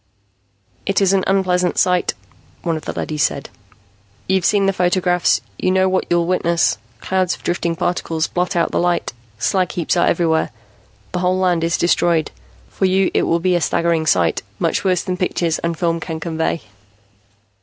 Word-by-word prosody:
"It 195 Hz, -, +2 dB
is 195 Hz, -1 st, +3 dB
an 190 Hz, -1 st, +2 dB
unpleasant 180 Hz, -2 st, +1 dB
sight," 180 Hz, -1 st, +2 dB, 0.5 s
one 165 Hz, -2 st, 0 dB
of 155 Hz, -, -7 dB
the -, -, -3 dB
leadys 150 Hz, -1 st, -3 dB
said. 140 Hz, -, -1 dB, 0.8 s
"You've 190 Hz, -2 st, +1 dB
seen 205 Hz, -2 st, +3 dB
the 195 Hz, -, +2 dB
photographs; 180 Hz, -1 st, +2 dB, 0.2 s
you -, -, +1 dB
know 190 Hz, 0 st, +3 dB
what 185 Hz, 0 st, 0 dB
you'll 175 Hz, -1 st, +2 dB
witness. 170 Hz, -1 st, +1 dB, 0.2 s
Clouds 185 Hz, -1 st, 0 dB
of -, -, -20 dB
drifting 170 Hz, -1 st, -1 dB
particles 165 Hz, -2 st, -1 dB
blot 180 Hz, +2 st, -2 dB
out 170 Hz, -, +1 dB
the -, -, 0 dB
light, 175 Hz, -5 st, 0 dB, 0.2 s
slag 180 Hz, -, 0 dB
heaps 175 Hz, 0 st, -1 dB
are 175 Hz, -, +3 dB
everywhere, 160 Hz, -2 st, +1 dB, 0.6 s
the 180 Hz, -, -2 dB
whole 180 Hz, +1 st, +1 dB
land 180 Hz, -3 st, +1 dB
is 170 Hz, +1 st, +1 dB
destroyed. 170 Hz, -2 st, +2 dB, 0.4 s
For 190 Hz, -, -2 dB
you 190 Hz, 0 st, +2 dB
it -, -, +1 dB
will 170 Hz, -, +2 dB
be 180 Hz, +1 st, +1 dB
a 175 Hz, -, +1 dB
staggering 165 Hz, -1 st, +1 dB
sight, 85 Hz, -, +2 dB, 0.2 s
much -, -, 0 dB
worse 185 Hz, -2 st, +1 dB
than 180 Hz, 0 st, -3 dB
pictures 175 Hz, -2 st, 0 dB
and 170 Hz, -1 st, -2 dB
film 170 Hz, -1 st, 0 dB
can 160 Hz, 0 st, -5 dB
convey." 160 Hz, 0 st, -2 dB
175 Hz, 175 wpm, -19 LUFS, 165-185 Hz, 0.8 s, is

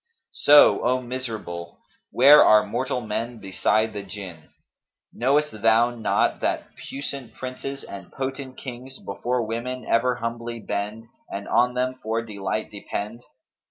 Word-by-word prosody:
So, 145 Hz, 0 st, +6 dB
O 125 Hz, +2 st, +2 dB
miserable! 110 Hz, -9 st, -5 dB, 0.3 s
where 145 Hz, +4 st, +8 dB
are 105 Hz, 0 st, +6 dB
mortal 125 Hz, +1 st, -2 dB
men 115 Hz, +2 st, -3 dB
beside 110 Hz, +2 st, 0 dB
the 105 Hz, -, -4 dB
Jinn? 95 Hz, -5 st, -9 dB, 0.6 s
Knowest 140 Hz, -2 st, +1 dB
thou 115 Hz, +2 st, +4 dB
not 115 Hz, -2 st, 0 dB
that -, -, -1 dB
puissant 140 Hz, -2 st, -5 dB
princes 135 Hz, +2 st, -6 dB
and 95 Hz, -3 st, -10 dB
potent 135 Hz, 0 st, -5 dB
Kings 130 Hz, +1 st, -8 dB
before 120 Hz, +5 st, -2 dB
women 120 Hz, +3 st, -4 dB
ever 125 Hz, +2 st, +2 dB
humbly 115 Hz, -1 st, -4 dB
bend 105 Hz, +1 st, -4 dB, 0.2 s
and 100 Hz, +1 st, -6 dB
on 125 Hz, +1 st, +2 dB
them 130 Hz, 0 st, -1 dB
for 115 Hz, +1 st, -1 dB
delight 105 Hz, -1 st, -4 dB
depend? 105 Hz, +2 st, -5 dB
115 Hz, 130 wpm, -24 LUFS, 105-130 Hz, 0.6 s, where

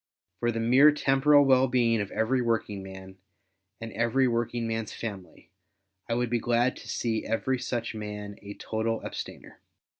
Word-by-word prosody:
For 120 Hz, 0 st, +1 dB
the 115 Hz, -, -3 dB
mere 130 Hz, +6 st, +6 dB
temporal 145 Hz, 0 st, +4 dB
well 130 Hz, -1 st, +5 dB
being 115 Hz, -3 st, +2 dB
of 100 Hz, -, -4 dB
every 115 Hz, +4 st, 0 dB
working 115 Hz, -4 st, -1 dB
man, 95 Hz, 0 st, -11 dB, 0.6 s
and 115 Hz, 0 st, -7 dB
every 115 Hz, +4 st, +2 dB
working 120 Hz, 0 st, -1 dB
man's 115 Hz, -1 st, -3 dB
family, 100 Hz, -5 st, -8 dB, 0.6 s
I 115 Hz, -, +1 dB
would 120 Hz, -1 st, -1 dB
be 120 Hz, -, +2 dB
glad 120 Hz, +2 st, +1 dB
to -, -, -11 dB
see 115 Hz, -2 st, -1 dB
every 130 Hz, +3 st, -1 dB
such 120 Hz, -2 st, -3 dB
man 105 Hz, -1 st, -6 dB
a 100 Hz, 0 st, -9 dB
total 115 Hz, +1 st, -2 dB
abstainer. -, -, -8 dB
115 Hz, 160 wpm, -27 LUFS, 110-125 Hz, 0.6 s, mere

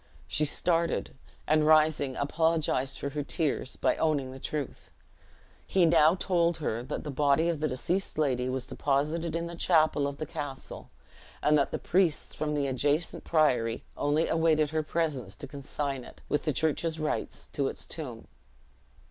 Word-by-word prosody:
She 150 Hz, -, +1 dB
started, 170 Hz, +3 st, +1 dB, 0.3 s
and 155 Hz, 0 st, +3 dB
rising, 155 Hz, -4 st, +4 dB
apologized 145 Hz, -3 st, 0 dB
for 140 Hz, -, -3 dB
her 150 Hz, +1 st, -2 dB
tears 145 Hz, -2 st, -1 dB
by -, -, +1 dB
owning 145 Hz, -5 st, 0 dB
the 130 Hz, -, -9 dB
truth. 145 Hz, -1 st, -5 dB, 0.8 s
He 185 Hz, -2 st, +4 dB
now 165 Hz, 0 st, +5 dB
told 175 Hz, -3 st, +1 dB
her, 120 Hz, -7 st, -2 dB
that 130 Hz, +4 st, -5 dB
the 150 Hz, -, -4 dB
body 145 Hz, +3 st, +2 dB
of 165 Hz, -3 st, -1 dB
the 155 Hz, -, +1 dB
deceased 170 Hz, +9 st, -2 dB
lady 130 Hz, -4 st, +1 dB
was 130 Hz, -1 st, -2 dB
deposited 155 Hz, +5 st, -1 dB
in 170 Hz, 0 st, -1 dB
the 170 Hz, 0 st, -6 dB
chapel 155 Hz, -4 st, +3 dB
of 140 Hz, 0 st, -5 dB
the 155 Hz, -, -4 dB
castle; 140 Hz, -2 st, -7 dB, 0.5 s
and 150 Hz, -, +4 dB
that 140 Hz, -2 st, +3 dB
the -, -, -2 dB
priests 180 Hz, -4 st, +1 dB
from 150 Hz, -1 st, -2 dB
the 145 Hz, -1 st, 0 dB
adjacent 145 Hz, +5 st, 0 dB
priory 125 Hz, -8 st, +2 dB
only 150 Hz, +3 st, +1 dB
awaited 160 Hz, -2 st, +2 dB
her 160 Hz, 0 st, +1 dB
presence 150 Hz, -, -2 dB
to 140 Hz, -, -7 dB
consign 140 Hz, -1 st, -4 dB
it, -, -, -14 dB
with 145 Hz, -, -1 dB
the 155 Hz, -, +2 dB
church's 160 Hz, +2 st, 0 dB
rites, 155 Hz, -, -3 dB
to 140 Hz, -2 st, 0 dB
its -, -, -6 dB
tomb. 125 Hz, -8 st, -7 dB
150 Hz, 165 wpm, -29 LUFS, 140-160 Hz, 0.8 s, now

